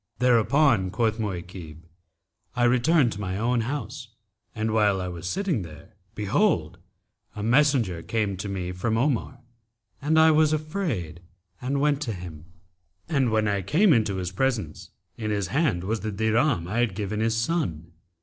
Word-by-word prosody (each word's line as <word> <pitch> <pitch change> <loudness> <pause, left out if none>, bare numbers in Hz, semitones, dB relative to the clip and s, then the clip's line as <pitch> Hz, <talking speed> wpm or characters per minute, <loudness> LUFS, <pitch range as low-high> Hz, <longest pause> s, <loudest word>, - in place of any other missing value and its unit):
Thereupon, 125 -3 +3
quoth 110 +2 0
Mu'aykib, 90 -5 -6 0.7
'I 120 - +1
returned 125 +2 +3
to 105 - -6
my 95 -1 -3
own 120 +2 +1
house, 130 0 -5 0.5
and 110 0 -1
while 105 -3 +3
I 90 - -3
was 90 -1 -6
sitting 180 - -1
there 85 +5 -11 0.2
behold, 105 - 0 0.6
a 105 - -5
messenger 120 - +2
came 105 0 -1
to 100 +2 -5
me 90 -2 -3
from 110 +5 -1
Omar 130 -1 0 0.6
and 155 +3 +1
I 160 0 +7
was 155 0 +4
afraid 150 - -3 0.4
and 140 +3 -1
went 145 0 +1
to 120 -7 -2
him, 85 -4 -9 0.6
and 140 -6 +1
when 110 -1 +1
I 100 -1 0
came 165 - +4
into 105 -5 +1
his 90 -1 -3
presence, 105 - -2 0.3
in 110 -2 -3
his 100 -3 -1
hand 135 - +1
was 110 +4 -1
the 110 +1 -4
dirham 110 - +1
I 105 +6 -2
had 120 -6 +1
given 105 +1 -3
his 110 0 +1
son. 115 - -2
110 Hz, 160 wpm, -25 LUFS, 95-135 Hz, 0.7 s, I